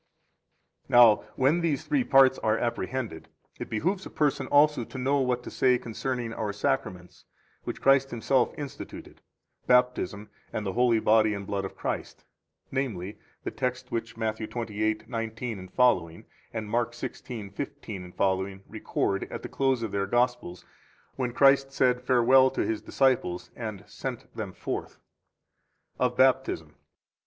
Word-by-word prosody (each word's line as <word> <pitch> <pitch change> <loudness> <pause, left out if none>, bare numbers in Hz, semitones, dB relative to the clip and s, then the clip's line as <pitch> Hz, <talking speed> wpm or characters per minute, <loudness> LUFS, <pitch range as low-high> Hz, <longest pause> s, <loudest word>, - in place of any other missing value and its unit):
20 120 - +5
Now, 115 -3 +9 0.2
when 140 +6 +3
these 160 -5 0
three 285 -4 +1
parts 135 - +5
are 110 0 +1
apprehended, 110 -8 -3 0.3
it - - -6
behooves 185 - -1
a - - -8
person 140 -3 0
also 150 -3 +4
to 130 - -9
know 135 +2 +1
what 125 -2 0
to - - -8
say 125 -1 +3
concerning 120 0 -4
our 110 -2 -2
Sacraments, 100 -6 -3 0.4
which - - -5
Christ 135 0 +5
Himself 120 +1 +1
instituted, 145 -2 -8 0.5
Baptism 125 -4 +2 0.2
and 105 - -3
the 95 - -2
holy 120 -1 +3
body 110 -1 +3
and 100 0 -6
blood 100 0 -2
of 95 - -7
Christ, - - -4 0.5
namely, 105 -7 -3 0.2
the - - -3
text 125 -1 -3
which 115 -1 -4
Matthew 110 -1 -2
28:19ff 110 -4 -1 0.3
and 110 -2 -4
Mark 120 +2 0
16:15f 100 -5 -4
record - - -2
at - - -6
the - - -6
close 135 -3 +1
of 110 - -3
their 100 0 -1
Gospels 120 -5 0 0.5
when 125 -2 -2
Christ 135 +1 +4
said 125 -2 +2
farewell 130 +1 +5
to - - -1
His 110 - -2
disciples 125 -10 0
and 110 -4 -6
sent 120 +4 -7
them 105 -4 -4
forth. - - -5 1.0
21 125 - +4
OF 125 - -18
BAPTISM. 130 0 +2
120 Hz, 140 wpm, -27 LUFS, 105-130 Hz, 1.0 s, Now